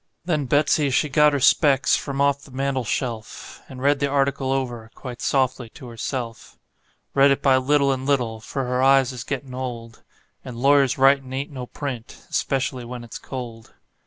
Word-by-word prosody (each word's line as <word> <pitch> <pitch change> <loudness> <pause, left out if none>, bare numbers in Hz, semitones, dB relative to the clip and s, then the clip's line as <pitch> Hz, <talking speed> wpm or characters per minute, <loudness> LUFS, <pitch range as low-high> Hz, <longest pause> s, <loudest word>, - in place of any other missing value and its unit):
Then 155 -5 0
Betsey 150 +1 +2
she 145 +3 +1
got 150 +2 +5
her 145 - 0
specs 135 -1 +4
from 140 -1 -4
off 140 0 +2
the 145 - -15
mantel 135 0 -2
shelf, 115 -1 -5
And 130 0 -9
read 140 0 +3
the 140 - +1
article 135 -1 0
over 120 -4 -3
quite 125 -3 -8
softly 130 -3 0
to 130 - -11
herself; 115 0 -6 0.6
Read 140 0 +5
it 140 - +1
by 135 -2 +5
little 140 +1 +2
and 130 -1 -2
little, 120 -6 0
for 135 +5 -4
her 125 0 -1
eyes 135 -1 +4
is 125 -2 -7
gettin' 135 -2 -5
old, 120 -3 -6 0.4
And 125 -2 -8
lawyers' 140 +1 +3
writin' 135 -1 +3
ain't 140 +3 -4
no 130 -3 -7
print, 130 -5 -7
especially 130 -2 -1
when 120 0 -7
it's 115 - -9
cold. 120 -4 -8
135 Hz, 180 wpm, -23 LUFS, 125-140 Hz, 0.6 s, got